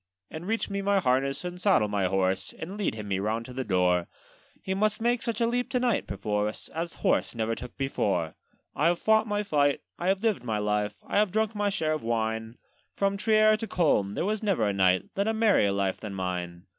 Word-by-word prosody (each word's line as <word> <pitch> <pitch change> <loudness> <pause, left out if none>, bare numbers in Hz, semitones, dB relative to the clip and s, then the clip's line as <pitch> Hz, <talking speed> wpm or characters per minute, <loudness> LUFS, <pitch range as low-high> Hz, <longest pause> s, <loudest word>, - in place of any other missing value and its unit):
'And 160 +3 -7
reach 225 +1 0
me 200 0 -3
my 200 0 +2
harness, 135 +1 0
and 180 0 -6
saddle 185 - +4
my 100 -2 0
horse, 95 0 0
And 180 +5 -6
lead 205 - -1
him 105 -2 -6
me 95 -1 -1
round 110 +3 -1
to 125 - -9
the 130 +1 -3
door: 90 -4 +2 0.6
He 190 - -1
must 210 +2 +1
take 240 +1 +1
such 230 -2 -2
a 235 - +3
leap 245 +1 -1
to 250 - 0
night 245 -3 +1
perforce, 105 +2 -2
As 165 +2 -4
horse - - +2
never 115 0 -1
took 125 +1 -8
before. 100 - -1 0.4
'I 155 - +2
have 175 0 +2
fought 220 0 +3
my 205 0 0
fight, 145 -7 +2 0.2
I 175 - -2
have 190 +2 +1
lived 215 - +1
my 110 -3 -1
life, 105 0 0
I - - -1
have 210 -3 +2
drunk 220 +1 0
my 205 -1 0
share 155 -5 0
of 155 - -3
wine; 110 0 -2 0.4
From 200 0 +1
Trier 215 +1 +4
to 225 - -5
Coln 105 - +1
there - - -1
was 215 +1 -1
never 195 - +1
a 100 - +1
knight 95 -1 +3
Led 200 +2 0
a 220 - +1
merrier 215 - +3
life 100 -1 -1
than 105 -2 -6
mine. 90 -1 -4
145 Hz, 225 wpm, -27 LUFS, -, 0.6 s, saddle